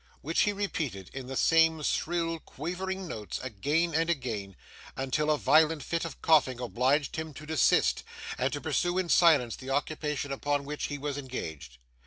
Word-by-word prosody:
which 165 +4 -1
he 210 - +2
repeated, 160 - -3
in 135 -2 -6
the 135 - -5
same 165 -1 +4
shrill 165 +1 0
quavering 185 +6 -5
notes, 110 -9 -5
again 145 +9 0
and 165 +2 +1
again, 110 - -2 0.4
until 135 +3 0
a 150 - +3
violent 155 +2 +4
fit 170 0 -2
of 165 - -7
coughing 140 -6 +4
obliged 130 +6 +1
him 160 -2 -5
to 150 - -9
desist, 160 0 +3 0.3
and - - 0
to - - -3
pursue 175 +1 0
in 185 -2 0
silence, 155 -11 +5
the 130 - -9
occupation 145 0 -2
upon 145 +1 -1
which 150 +1 -3
he 145 - -4
was 145 0 -3
engaged. 80 - -6
150 Hz, 170 wpm, -29 LUFS, 130-165 Hz, 0.4 s, silence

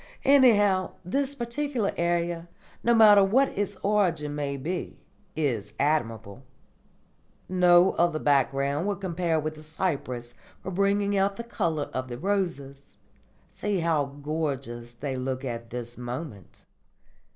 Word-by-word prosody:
Anyhow, 205 -9 +5
this 275 +8 -1
particular 245 -2 -2
idea, 170 0 -1 0.3
no 235 0 +4
matter 210 -3 +8
what 255 +8 +3
its 205 0 -3
origin 175 -8 +1
may 140 -1 -3
be, 170 +6 -4 0.4
is 130 -10 -2
admirable. 115 -7 -1 1.1
No 180 0 +5
other 170 -2 +1
background 140 +2 +1
will 205 - 0
compare 175 -4 -1
with 155 +1 -3
the 155 - -13
cypress 140 -7 -3 0.3
for 190 - -6
bringing 200 +2 +1
out 195 0 +1
the 235 - -6
colour 170 -10 -2
of 130 0 -3
the 120 -1 -6
roses. 165 -7 -3 0.5
See 205 -4 -2
how 160 -3 +1 0.2
gorgeous 135 -6 -3
they 130 +3 -5
look 130 +1 -3
at 115 -2 -5
this 120 0 -6
moment." 125 - -7
165 Hz, 130 wpm, -27 LUFS, 135-195 Hz, 1.1 s, matter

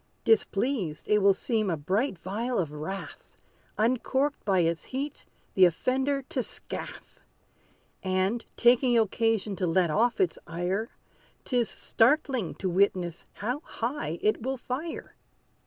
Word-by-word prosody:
Displeased, 210 - +1
it 210 - +4
will 200 -1 +5
seem 215 -1 0
a 165 - 0
bright 195 - 0
vial 225 +8 -3
of 155 -5 -1
wrath, 175 +6 -7 0.4
Uncorked 260 +5 +1
by 190 -3 +3
its 165 0 0
heat, 275 +3 -5 0.3
the 190 - +7
offender 265 - +1
to 260 0 -2
scath; - - -8 0.8
And, 190 +5 0
taking 245 0 +5
occasion 220 -1 +1
to 185 - 0
let 170 0 +2
off 230 +7 +2
its 180 -3 +1
ire, 180 +6 -2 0.6
'Tis 245 -3 +1
startling 255 - +1
to 190 - -3
witness 180 -2 +1
how 245 +7 -3
high 230 - -4
it 215 +1 +2
will 265 +3 -2
fire. 270 +7 -5
215 Hz, 130 wpm, -28 LUFS, 185-255 Hz, 0.8 s, the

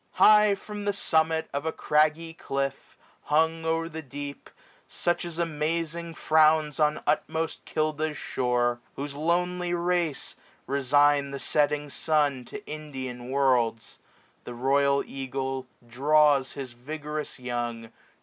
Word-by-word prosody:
High 210 -1 +6
from 205 +1 -8
the 205 - +1
summit 160 -3 +1
of 140 0 -2
a 160 - -1
craggy 155 +2 +1
cliff. 135 -3 -4 0.3
Hung 160 +2 +2
o'er 165 0 0
the 160 -1 -7
deep, 145 0 -8 0.4
such 175 0 -1
as 170 -2 -6
amazing 165 +1 -2
frowns 155 -1 +3
On 150 0 +2
utmost 160 0 -1
Kilda's 155 0 -1
shore; 120 -1 0 0.2
whose 140 +1 -5
lonely 175 +3 0
race 170 -4 -1 0.3
Resign 140 +1 +3
the 140 - -5
setting 150 0 0
sun 145 -5 +1
to 210 +8 -9
Indian 130 -5 -6
worlds; 125 -4 +1 0.4
755 - - -38
The 120 - -6
royal 140 +2 +2
eagle 135 -1 -4 0.2
draws 140 +2 +3
his 130 -3 -7
vigorous 150 +4 -6
young. 120 -2 -4
150 Hz, 125 wpm, -27 LUFS, 135-160 Hz, 0.4 s, High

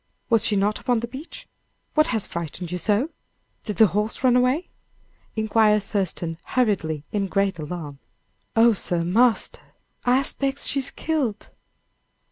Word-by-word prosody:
Was 225 -2 +4
she 210 - +1
not 205 +2 +1
upon 245 -2 +1
the 235 - -3
beach? 300 - -10 0.5
What 305 +1 +4
has 220 -5 0
frightened 170 +1 -5
you 180 - -2
so? 220 - +1 0.5
Did 210 - -3
the 220 - +7
horse 210 +4 -1
run 250 -2 +5
away?" 255 +7 +2 0.7
inquired 215 -1 +3
Thurston, 175 -5 -2
hurriedly, 185 - 0
in 205 -2 0
great 195 -2 0
alarm. 150 -3 -6 0.6
"Oh, 230 +1 +6
sir, 175 -4 -1
marster! 225 +7 +2 0.4
I 250 +1 +4
'spects 275 0 -1
she's 275 -1 0
killed!" 285 -10 -2
215 Hz, 140 wpm, -24 LUFS, 185-250 Hz, 0.7 s, the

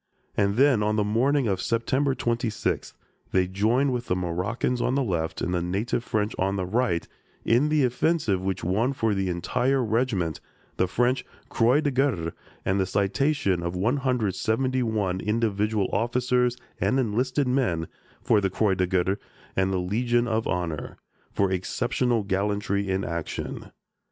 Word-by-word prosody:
And 100 0 +2
then, 130 -3 +4
on 105 +1 +1
the 105 - +2
morning 125 +6 +2
of 95 -3 0
September 130 +6 +1
26th, 115 -3 -1 0.4
they 95 -1 +3
joined 115 +9 +1
with 120 -1 -3
the 90 - +1
Moroccans 95 +8 -1
on 130 - +1
the 140 - +2
left 85 -8 -2
and 90 0 -1
native 110 +5 -1
French 105 -2 -1
on 95 +1 +1
the 95 -2 -1
right 105 -3 0 0.4
in 125 +6 +3
the 150 -2 +3
offensive 125 - +1
which 95 -1 -2
won 110 +10 +1
for 115 -5 0
the 95 -1 -1
entire 125 +10 0
regiment 110 - 0 0.4
the 95 - +2
French 120 +7 +1 0.3
Croix 125 +5 +3
de 145 -2 0
Guerre 125 -12 0 0.3
and 95 +1 +1
the 95 - +1
citation 100 - +1
of 85 +1 -3
171 115 -2 0
individual 105 -1 0
officers 125 +2 +1 0.2
and 130 - +2
enlisted 130 +4 0
men 110 - 0 0.4
for 105 - +3
the 95 - +1
Croix 95 +2 +1
de 90 -1 0
Guerre 95 +2 +1 0.4
and 95 0 +1
the 95 - +1
Legion 120 +6 +1
of 110 0 0
Honor, 85 -3 -3 0.3
for 100 -1 +1
exceptional 115 +5 0
gallantry 100 0 -1
in 95 +1 0
action. 85 -2 -5
105 Hz, 150 wpm, -26 LUFS, 95-125 Hz, 0.4 s, then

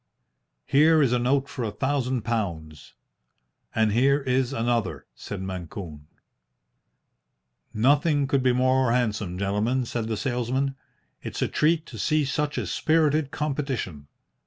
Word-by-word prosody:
"Here 155 +3 +5
is 125 -3 +2
a 125 - +2
note 135 +3 +1
for 130 -1 -5
a 110 - -1
thousand 130 +1 -1
pounds." 85 - -4 0.8
"And 110 -1 +3
here 135 +6 +3
is 130 -1 0
another," 115 -5 -1
said 95 - -7
Mancune. 85 -4 -7 1.6
"Nothing 145 +5 +3
could 135 0 +1
be 130 0 +3
more 130 -1 +2
handsome, 105 -7 -1
gentlemen," 105 +6 0
said 115 -1 -3
the 110 -1 -2
salesman. 130 +2 -1 0.5
"It's - - -3
a - - +1
treat 160 +1 +1
to 115 -8 -10
see 155 +6 +1
such 150 +2 -2
a - - -1
spirited 155 -2 +1
competition. 135 - -3
125 Hz, 135 wpm, -25 LUFS, 110-140 Hz, 1.6 s, Here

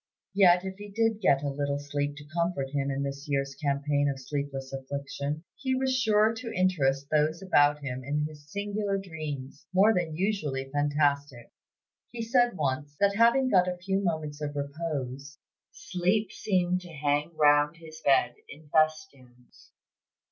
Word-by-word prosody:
Yet 185 -2 +5
if 190 0 -5
he 205 0 -8
did 225 +1 0
get 140 -7 +3
a 145 - 0
little 140 0 -1
sleep 145 0 -3
to 145 0 -11
comfort 170 -6 -1
him 140 -1 -1
in 140 0 -1
this 140 +1 -5
year's 140 -1 0
campaign 145 0 0
of 135 -1 -3
sleepless 135 -1 -4
affliction, 140 +2 -4
he 260 -1 -1
was 260 0 +1
sure 220 -3 +3
to 230 0 -6
interest 140 -7 +1
those 155 +2 +2
about 145 -5 +3
him 130 -1 -4
in 150 +3 -1
his 150 -1 -10
singular 205 0 -2
dreams, 155 -7 -7
more 200 +4 +5
than 170 -5 -1
usually 155 -8 -1
fantastic. 145 -3 0 0.6
He 235 -1 -5
said 240 -2 +2
once, 145 0 -2
that 200 0 +3
having 235 +4 +4
got 185 -5 +4
a 180 0 -2
few 190 +2 -1
moments 155 -4 -2
of 145 -1 -4
repose, 140 -2 -4 0.3
'sleep 190 +3 -1
seemed 180 -3 0
to 175 -1 -11
hang 145 +2 -1
round 150 +1 +4
his 160 -1 -12
bed 130 -3 +4 0.2
in 150 +1 -13
festoons.' 150 -6 -2
150 Hz, 160 wpm, -28 LUFS, 140-185 Hz, 0.6 s, Yet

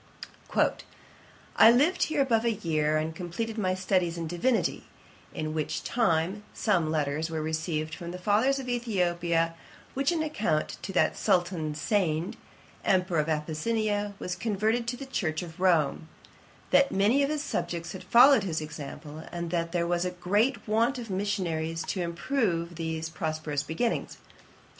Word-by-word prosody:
'I 225 - +10
lived 295 +9 +3
here 305 -3 +1
above 230 -4 +2
a 235 - +2
year, 155 -5 0
and 160 +1 -2
completed 215 +7 -4
my 185 -2 +1
studies 185 -2 0
in 165 - -3
divinity; 200 +9 0 0.5
in 155 0 -4
which 155 -2 -2
time 190 -3 +1
some 175 -8 +1
letters 155 +1 -1
were 160 -1 -3
received 155 0 -2
from 170 +1 -6
the 180 - -5
fathers 215 +9 +2
of 265 -2 -5
Ethiopia, 175 -8 0 0.4
with 275 +1 +1
an 330 -2 0
account 215 - -1 0.2
that 185 - +2
Sultan 175 -4 0
Segned, 165 -1 0 0.5
Emperour 180 -3 +2
of 150 +1 0
Abyssinia, 205 +7 -1
was 180 -2 -4
converted 220 +2 0
to 245 +1 -2
the 275 - -7
church 165 -11 -2
of 170 0 -10
Rome; 165 -4 +2 0.6
that 280 0 +5
many 210 +8 +3
of 280 - +2
his 305 -1 -1
subjects 170 - -3
had 190 -2 -8
followed 245 +8 +7
his 165 -5 -1
example, 150 +1 -8
and 170 -1 -4
that 170 -1 -1
there 170 -1 0
was 175 0 0
a 180 - 0
great 205 +9 0
want 230 +5 +2
of 230 -4 -6
missionaries 170 -5 -1
to 185 - -3
improve 175 -1 -1
these 160 -1 -3
prosperous 155 -3 -3
beginnings. 230 +11 -2
180 Hz, 150 wpm, -28 LUFS, 160-220 Hz, 0.6 s, I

